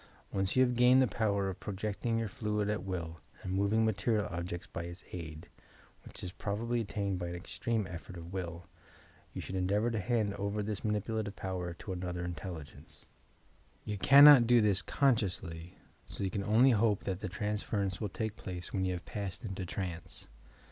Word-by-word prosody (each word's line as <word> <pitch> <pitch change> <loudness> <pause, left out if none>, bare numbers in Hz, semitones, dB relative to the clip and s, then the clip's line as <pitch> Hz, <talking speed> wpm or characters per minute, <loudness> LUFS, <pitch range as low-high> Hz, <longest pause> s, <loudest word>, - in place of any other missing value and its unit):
Once 95 0 -1
yon 130 0 +6
have 125 -1 -1
gained 125 +2 +6
the 130 - +6
power 100 -4 0
of 95 - -4
pro 105 - -5
jecting 110 +3 -1
your 115 -1 -1
fluid 105 0 -1
at 105 -4 -2
will 85 -4 -4 0.2
and 95 - -3
moving 100 +3 +2
material 110 0 +1
objects 85 0 -4
by 85 - -6
its 85 +2 -8
aid 80 -2 -7 0.6
(which - - -11
is 90 - -4
probably 115 +5 -2
attained 100 -3 -2
by 90 - -3
an 85 - -4
extreme 110 +4 -2
effort 90 0 -8
of 85 +2 -9
will) 85 -2 -5 0.7
you - - -5
should - - -7
endeavour 100 +5 +1
to 110 - -1
hand 110 -1 0
over 100 +1 -1
this 105 -1 -3
manipu 110 +1 -1
lative 100 -2 -6
power 90 -2 -4
to 95 - -6
another 90 -1 -3
iDtelligene^e. 85 -3 -8 0.8
You 105 -1 -3
cannot 140 0 +9
do 120 0 +6
this 105 -3 +3
consciously 95 - 0 0.3
so - - -6
you 95 - -1
can 100 - -2
only 115 +6 +5
hope 110 -3 +2
that 95 -2 -2
the 105 - -4
transference 105 0 -2
will 105 - -1
take 110 +2 -3
plaee 90 -2 -7
when 95 -1 0
you 90 - 0
have 90 - -6
passed 100 +2 -5
into 95 -3 -4
trance. 90 -2 -5
100 Hz, 190 wpm, -32 LUFS, 90-110 Hz, 0.8 s, cannot